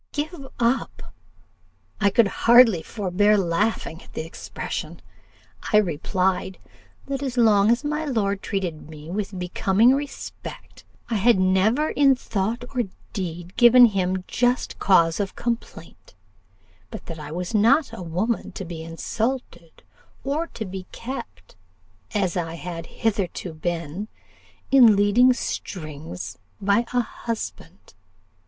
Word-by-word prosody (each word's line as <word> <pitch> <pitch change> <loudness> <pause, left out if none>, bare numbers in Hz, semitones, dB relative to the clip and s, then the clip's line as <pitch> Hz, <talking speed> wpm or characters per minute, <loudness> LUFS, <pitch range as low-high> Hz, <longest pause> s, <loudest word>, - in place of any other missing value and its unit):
"'Give 295 -1 -4
up!' 240 +2 -1 0.9
I 205 -2 +4
could 225 +1 +4 0.2
hardly 235 -7 +7
forbear 205 +2 +1
laughing 175 -1 -1
at - - -17
the 155 - -4
expression. 165 - -6 0.7
I 210 - +6
replied, 185 +1 0 0.5
'that 275 -1 -3
as 260 -3 -3
long 215 -3 +5
as 235 +4 +2
my 300 +1 -2
lord 205 -7 -1
treated 175 -6 -4
me 155 +1 -10
with 200 0 -3
becoming 195 +6 +3
respect, 280 +1 -7 0.3
I 225 - +2
had 230 +2 +4
never 190 +10 +2
in 275 -2 +4
thought 225 +1 -3
or 245 -3 0 0.3
deed 175 -3 -5
given 245 +1 +8
him 190 -4 0
just 245 +1 0
cause 170 -3 +4
of 200 -2 -2
complaint; 240 - -6 0.7
but 220 - -9
that 165 -2 -7
I 150 0 -8
was 175 +5 -4
not 230 +5 +3
a 230 - -7
woman 180 +7 -2
to 195 - -6
be 165 -1 -7
insulted, 170 +2 -4 0.4
or 295 +5 -1
to 220 - -4
be 185 -1 -7
kept, 270 - -8 0.6
as 195 -3 0
I 165 -2 -2
had 170 -1 -6
hitherto 195 -6 -2
been, 170 +4 -4 0.6
in 245 -6 +7
leading 205 +6 +5
strings 160 - -5 0.2
by 205 +4 +2
a 245 - +2
husband. 230 -1 -7
205 Hz, 130 wpm, -24 LUFS, 180-240 Hz, 0.9 s, given